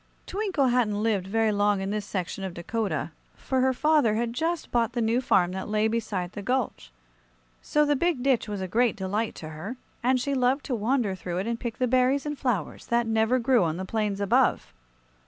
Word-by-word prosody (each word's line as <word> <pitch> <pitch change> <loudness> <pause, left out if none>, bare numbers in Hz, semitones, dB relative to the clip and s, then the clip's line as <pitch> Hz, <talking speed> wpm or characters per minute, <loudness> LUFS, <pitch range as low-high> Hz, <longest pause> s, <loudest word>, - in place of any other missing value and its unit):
Twinkle 380 -10 0
hadn't 215 -4 +1
lived 205 -5 0
very 220 +2 +2
long 205 -1 +2
in 195 +1 -3
this 210 -1 -3
section 190 0 -4
of 185 -2 -5
Dakota, 220 +4 -2 0.2
for 260 -1 -1
her 260 0 +3
father 290 -5 +3
had 230 +1 -1
just 325 +5 -2
bought 235 -2 +1
the 245 - -1
new 230 +2 +2
farm 180 -7 +3
that 190 +2 -5
lay 215 +1 +2
beside 210 -6 -2
the 205 - -7
gulch. 230 - -2 0.7
So 300 0 +2
the 290 0 +2
big 320 -3 0
ditch 260 -5 +2
was 205 -2 -3
a 190 - -3
great 230 +4 +2
delight 205 +4 -2
to 155 - -8
her, 160 +11 -7 0.2
and 255 +1 +2
she 280 +3 -1
loved 260 +2 +1
to 255 - -1
wander 230 -1 0
through 180 -2 -5
it 190 - -1
and 230 0 -2
pick 235 -2 -4
the 255 - +1
berries 255 +3 +2
and 295 0 -2
flowers 240 - -2
that 235 0 +2
never 225 +2 +2
grew 245 -3 +3
on 160 -1 -1
the 190 - -4
plains 210 -1 -1
above. 200 -1 +2
225 Hz, 210 wpm, -26 LUFS, 200-255 Hz, 0.7 s, her